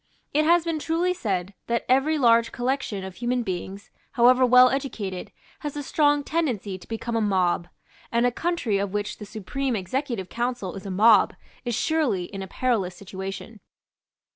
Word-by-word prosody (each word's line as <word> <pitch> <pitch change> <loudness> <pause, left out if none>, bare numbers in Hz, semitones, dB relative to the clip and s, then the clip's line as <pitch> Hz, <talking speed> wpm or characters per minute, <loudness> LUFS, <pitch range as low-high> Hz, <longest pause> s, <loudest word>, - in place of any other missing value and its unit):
It 305 +1 +3
has 340 +1 +4
been 330 -2 -1
truly 335 +4 0
said 195 - -2
that 235 0 -1
every 270 +5 +3
large 230 -3 +4
collection 245 -5 -2
of 190 -1 -8
human 245 0 0
beings, 190 +1 -5 0.2
however 250 +2 +5
well 250 0 +7
educated, 215 -9 -4 0.3
has 295 -1 -5
a 290 - -3
strong 290 0 +2
tendency 240 - -2
to - - -15
become 230 +1 -4
a 225 - +2
mob; 185 -4 +1 0.4
and 235 +1 +2
a 245 - +3
country 285 - -1
of 200 -1 -2
which 205 0 -2
the 210 - -8
Supreme 235 +6 -3
Executive 220 +1 -3
Council 240 -4 -3
is 195 0 -8
a - - -4
mob 210 +4 +5 0.3
is 240 -2 -1
surely 295 - +1
in 195 +2 -7
a 190 - -5
perilous 200 -5 -1
situation. 195 +3 -7
235 Hz, 170 wpm, -25 LUFS, 195-270 Hz, 0.4 s, well